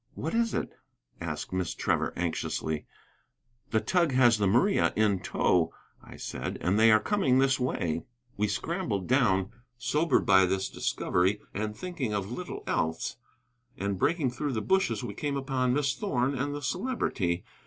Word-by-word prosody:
"What 160 - -3
is 230 -1 +1
it?" - - -2 0.5
asked 80 0 -5
Miss 90 -2 -1
Trevor, - - 0
anxiously. 80 -2 -2 0.8
"The 110 - +2
tug 170 +6 +1
has 120 -3 +5
the 100 - +2
Maria 125 - +3
in 105 -3 +2
tow," 85 -2 +1 0.3
I - - -12
said, - - -4
"and 95 +4 +1
they 110 0 +7
are 110 - +6
coming 135 - +2
this 135 0 +3
way." 85 -10 -1 0.3
We 105 +1 +1
scrambled 105 - -2
down, 105 -7 +2 0.3
sobered 150 +3 +1
by 95 -3 +6
this 95 +1 -1
discovery 95 +4 0
and 105 0 -3
thinking 170 -12 -3
of 100 +1 -3
little 180 +8 -6
else. 80 +7 -1 0.6
And 100 -1 -2
breaking 150 - +1
through 140 +3 -3
the 110 - -1
bushes 190 - +1
we 100 - -4
came 140 +5 -2
upon 130 -2 0
Miss 140 -1 +1
Thorn 135 - 0
and 145 +2 -2
the 145 - -6
Celebrity. 100 - -1
115 Hz, 160 wpm, -29 LUFS, 95-145 Hz, 0.8 s, they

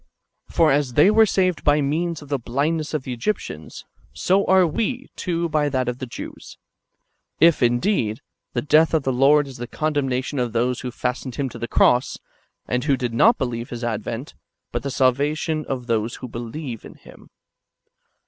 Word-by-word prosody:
For 160 -2 +3
as 140 -3 +1
they 150 - +6
were 220 0 +5
saved 185 -4 +1
by 145 0 +4
means 155 +3 -1
of 145 - -15
the 140 -2 0
blindness 150 +6 -1
of 150 - -2
the 130 - -4
Egyptians, 115 - -4 0.3
so 195 +2 +2
are 190 -1 +5
we, 245 - -2
too, 170 -1 -1
by 150 -2 +1
that 130 -2 -1
of 125 0 -3
the 130 - -5
Jews; - - -9 0.8
if, 165 0 +5
indeed, 120 - +1 0.3
the 120 - -1
death 155 +2 +4
of 155 - +1
the 130 - 0
Lord 140 +3 +4
is 135 - -10
the 120 0 -6
condemnation 140 -2 -1
of 120 -3 -1
those 120 +2 0
who 125 - -4
fastened 125 0 -4
Him 140 -2 -2
to - - -10
the 120 - -3
cross, 125 +2 +3 0.5
and 125 0 -1
who 140 -3 +2
did 120 -2 -3
not 220 - +5
believe 120 -2 -3
His 120 0 -6
advent, 115 +4 -4 0.4
but 120 - -2
the 140 - -4
salvation 145 +4 0
of 125 -2 -3
those 115 -1 -1
who 130 - -8
believe 120 +1 -6
in - - -12
Him. - - -17
135 Hz, 185 wpm, -22 LUFS, 120-155 Hz, 0.8 s, they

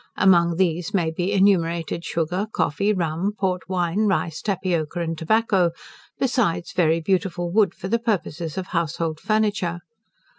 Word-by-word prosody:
Among 170 -3 +4
these 175 +2 0
may 165 -4 +1
be 175 +3 -2
enumerated 170 -4 +2
sugar, 175 +6 -2
coffee, 200 +5 0
rum, 175 +1 -1
port 185 -2 -2
wine, 185 +3 +1
rice, 170 -5 -1
tapioca, 175 -5 -1
and 165 -1 -2
tobacco, 190 +1 +2 0.5
besides 205 -10 0
very 165 -2 +2
beautiful 175 0 -1
wood 210 +1 +3
for - - -6
the 230 +4 +1
purposes 175 -8 -2
of 190 -1 -4
household 165 -1 -2
furniture. 205 -5 0
175 Hz, 140 wpm, -23 LUFS, 165-195 Hz, 0.5 s, Among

